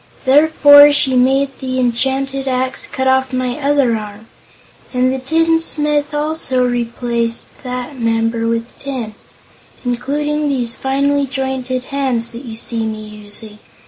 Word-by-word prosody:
Therefore 290 +1 +7
she 270 -2 +3
made 270 +2 +2
the 260 -1 -3
enchanted 265 +2 -1
axe 255 0 -1
cut 265 - -3
off 260 0 +2
my 255 +1 -2
other 280 -4 +2
arm, 210 0 -8 0.7
and 255 +1 +2
the 265 - -3
tinsmith 300 0 +1
also 295 -4 0
replaced 235 -1 -3
that 250 +1 -6
member 230 0 0
with 230 +1 -3
tin, 255 -6 -5 0.7
including 295 +5 -1
these 245 -4 +2
finely 280 +1 0
jointed 265 -1 -3
hands 250 -4 0
that 235 +3 -9
you 225 -2 -8
see 230 0 -3
me 215 -1 -5
using. 210 0 -6
260 Hz, 130 wpm, -16 LUFS, 235-280 Hz, 0.7 s, Therefore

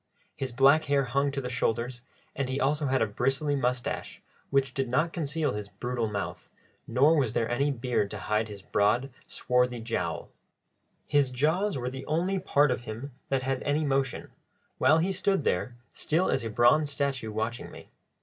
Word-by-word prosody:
His 130 -2 -4
black 140 +5 +5
hair 140 -1 +2
hung 140 +3 +1
to 135 -1 -4
his 125 - -4
shoulders, 120 0 -1 0.3
and 135 -2 -2
he 130 +1 -1
also 145 +2 +1
had 130 -2 +2
a - - +3
bristly 135 +7 0
moustache, 125 -2 -2 0.3
which 135 -1 +1
did 135 -2 -1
not 155 +7 +1
conceal 155 - -1
his 105 -1 -5
brutal 120 -1 -2
mouth, 100 -2 -5 0.4
nor 140 +7 +4
was 130 -7 +1
there 115 -2 +1
any 140 +5 +1
beard 125 -6 0
to - - -6
hide 105 +1 0
his 100 -3 -9
broad, 115 +8 +1 0.2
swarthy 125 -1 +1
jowl. 115 0 -3 0.8
His 145 -3 +3
jaws 160 +9 +1
were 125 0 -3
the 135 0 -7
only 180 +5 0
part 145 -6 +3
of 125 - -1
him 120 +6 -6 0.2
that 135 -1 0
had 135 0 -1
any 150 +2 0
motion, 135 -2 -1 0.5
while 155 - +5
he 175 +4 +1
stood 195 -2 +1
there, 120 +5 0 0.2
still 165 +4 0
as - - 0
a 115 - -3
bronze 130 +7 +4
statue, 140 -5 -2
watching 110 +3 -3
me. - - -13
135 Hz, 180 wpm, -28 LUFS, 120-145 Hz, 0.8 s, black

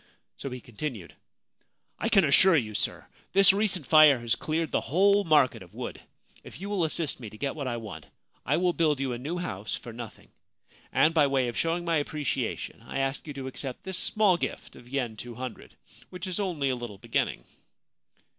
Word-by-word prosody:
So 135 - -6
he 125 0 -6
continued: 115 - -6 0.4
' - - -46
1 225 - 0
can 195 -7 +5
assure 165 +5 +6
you, 110 -6 -1
sir, 100 - -2 0.3
this 195 0 +7
recent 195 -6 0
fire 155 -2 +7
has 120 -1 0
cleared 160 0 -2
the - - +1
whole 200 +6 +3
market 150 -6 +4
of - - -14
wood. - - -6 0.4
If - - -11
you 200 +2 -5
will 195 -4 +1
assist 160 -2 -1
me 115 -4 -7
to 110 - -13
get 135 +5 -2
what 140 -4 -4
I 120 -2 -2
want 110 -3 -8 0.4
I - - +1
will 180 0 +2
build 155 -5 +2
you 135 -2 -1
a 120 - -5
new 155 +8 -3
house 105 - -3
for 120 - -9
nothing, 115 -2 -9 0.6
and 160 - +4
by 150 -3 +5
way 135 -3 +1
of 120 - -7
showing 170 +1 0
my 165 -1 +2
appreciation 145 -6 -3
I 120 - -6
ask 135 +3 -1
you 145 - -5
to 135 -1 -5
accept 130 -1 -6
this 190 -1 -3
small 205 -5 +3
gift - - -5
of 120 - -14
yen 125 -5 -2
200, 120 +2 -8 0.3
which 180 +1 -7
is 185 0 -3
only 170 -9 0
a 130 - +1
little 120 -5 -7
beginning.' - - -1
145 Hz, 200 wpm, -28 LUFS, 120-175 Hz, 0.6 s, this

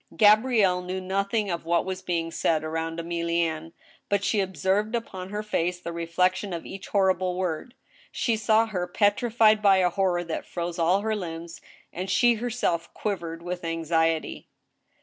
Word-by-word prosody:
^ - - -17
Gabrielle 210 -3 +5
knew 180 +1 -4
nothing 200 +3 -1
<^ 170 -3 -3
what 170 +1 +1
was 185 -1 -4
being 165 -2 -2
said 160 -1 +1
around 165 +1 -3
£milienne» 170 -1 -1 0.4
but 200 -1 +1
she 210 - +1
observed 190 +4 0
upon 190 -5 -5
her 210 +1 -4
face 180 -4 -1
the 170 -1 -6
reflection 180 +3 0
of 170 - -5
each 195 0 -8
horrible 185 -2 +1
word. 185 +7 -3 0.4
She 235 - 0
^w 220 +1 +2
her 180 -4 -2
petrified 215 +3 +3
by 200 -2 +5
a 180 -1 +3
horror 180 -1 +1
that 165 -2 -5
froze 175 0 -4
all 180 +4 +3
her 220 0 -1
limbs, 170 -3 -6 0.3
and 185 +3 -4
she 240 +6 +4
herself 225 -8 -2
quivered 170 -5 -4
with 180 0 -5
anxiety. 165 -1 0
185 Hz, 165 wpm, -26 LUFS, 170-205 Hz, 0.4 s, Gabrielle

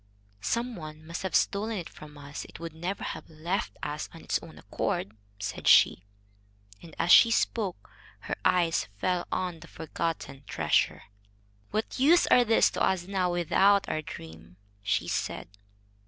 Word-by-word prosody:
"Some 235 - -1
one 155 -2 -9
must 165 +1 -5
have 190 - -2
stolen 215 +2 +1
it 175 - -5
from 150 -1 -13
us. 145 0 -7
It - - -12
would 165 -1 -6
never 175 +5 -4
have - - -6
left 170 +7 -3
us 150 +1 -4
of 165 - -12
its - - 0
own - - -12
accord," 105 - -3 0.2
said 105 +1 -5
she. 90 - +6 0.8
And, 165 -2 -13
as 175 - +1
she 230 - +9
spoke, 205 - -1 0.3
her - - -3
eyes 170 -2 +2
fell 180 - -1
on 180 -3 -2
the 170 - -13
forgotten 160 -4 -4
treasure. 75 -2 +1 0.7
"What 215 +4 -3
use 325 +7 +6
are 245 - +6
these 225 -1 +4
to - - -4
us 185 -2 +1
now, 185 -2 0
without 190 +4 +3
our 155 - -1
dream?" 80 - -11 0.2
she - - 0
said. - - -3
170 Hz, 160 wpm, -28 LUFS, 155-195 Hz, 0.8 s, she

